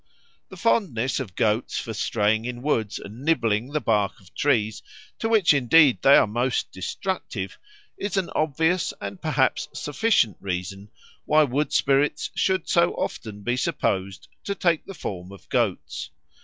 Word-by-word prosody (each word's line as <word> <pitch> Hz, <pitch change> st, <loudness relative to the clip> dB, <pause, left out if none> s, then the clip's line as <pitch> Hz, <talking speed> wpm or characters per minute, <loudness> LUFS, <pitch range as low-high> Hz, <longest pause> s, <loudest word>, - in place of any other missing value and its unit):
The -, -, -11 dB
fondness 140 Hz, -, +1 dB
of 105 Hz, -10 st, -6 dB
goats 110 Hz, +2 st, 0 dB
for 115 Hz, -3 st, -4 dB
straying 110 Hz, +1 st, 0 dB
in 125 Hz, 0 st, -5 dB
woods 110 Hz, -8 st, 0 dB
and 110 Hz, +5 st, -10 dB
nibbling 115 Hz, -8 st, +1 dB
the 150 Hz, +2 st, -2 dB
bark 105 Hz, -7 st, 0 dB
of 95 Hz, -1 st, -21 dB
trees, 110 Hz, -7 st, +1 dB, 0.4 s
to 225 Hz, -, -1 dB
which 215 Hz, -8 st, +5 dB
indeed 140 Hz, +1 st, +5 dB
they 140 Hz, -, +7 dB
are -, -, +6 dB
most 120 Hz, +4 st, -1 dB
destructive, 95 Hz, -, -4 dB, 0.4 s
is 200 Hz, 0 st, -3 dB
an 190 Hz, -3 st, -1 dB
obvious 160 Hz, +4 st, +1 dB
and 100 Hz, -1 st, -7 dB
perhaps -, -, +1 dB
sufficient 145 Hz, -, +1 dB
reason 95 Hz, +2 st, -5 dB, 0.4 s
why 155 Hz, 0 st, +5 dB
wood 145 Hz, +2 st, -1 dB
spirits 145 Hz, +2 st, +1 dB
should 190 Hz, -3 st, 0 dB
so 170 Hz, 0 st, +3 dB
often 105 Hz, -2 st, -5 dB
be 120 Hz, +4 st, 0 dB
supposed 100 Hz, -, -2 dB, 0.2 s
to 200 Hz, -, -2 dB
take 170 Hz, -4 st, +1 dB
the 195 Hz, -, -8 dB
form 95 Hz, -, -6 dB
of 100 Hz, -, -14 dB
goats. -, -, -1 dB
125 Hz, 155 wpm, -24 LUFS, 105-155 Hz, 0.4 s, they